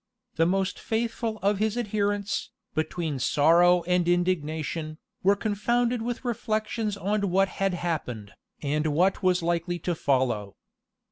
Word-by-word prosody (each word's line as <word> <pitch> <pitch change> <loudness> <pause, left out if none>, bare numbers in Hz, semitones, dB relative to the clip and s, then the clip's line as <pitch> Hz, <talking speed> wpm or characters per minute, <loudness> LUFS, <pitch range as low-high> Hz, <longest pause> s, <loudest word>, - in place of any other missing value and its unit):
The 165 0 +3
most 190 +1 0
faithful 225 0 -2
of 200 0 +2
his 220 +1 0
adherents, 205 -2 -1 0.2
between 155 -2 -2
sorrow 170 +7 +4
and 180 0 +1
indignation, 160 -3 -1 0.2
were 200 +2 +4
confounded 235 +4 0
with 240 +2 -4
reflections 220 -2 -1
on 200 +1 0
what 195 +2 +3
had 195 -2 +2
happened, 125 -12 -3 0.3
and 150 +2 0
what 185 +4 +2
was 180 -2 +2
likely 175 +1 0
to 175 +1 -2
follow. 125 -10 0
180 Hz, 130 wpm, -27 LUFS, 160-210 Hz, 0.3 s, sorrow